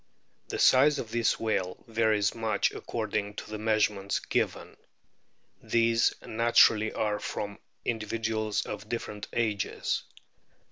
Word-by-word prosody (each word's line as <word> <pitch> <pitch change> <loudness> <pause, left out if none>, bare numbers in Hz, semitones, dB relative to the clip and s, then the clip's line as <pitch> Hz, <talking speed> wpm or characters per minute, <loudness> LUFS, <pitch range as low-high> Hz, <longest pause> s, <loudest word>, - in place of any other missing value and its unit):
The - - -4
size 145 +3 +5
of 110 - -5
this 115 -1 +1
whale 95 -5 -1
varies 110 -2 +2
much 115 -1 0
according 105 -2 -3
to - - -8
the 110 - -4
measurements 105 -2 +1
given. - - -2 0.8
These 115 0 +2
naturally 110 -1 +4
are 105 -1 -1
from 100 0 -5 0.3
indi 110 -3 -2
viduals 110 -1 -1
of 105 - -7
different 105 -3 -4
ages. 110 -4 -1
110 Hz, 120 wpm, -29 LUFS, 105-115 Hz, 0.8 s, size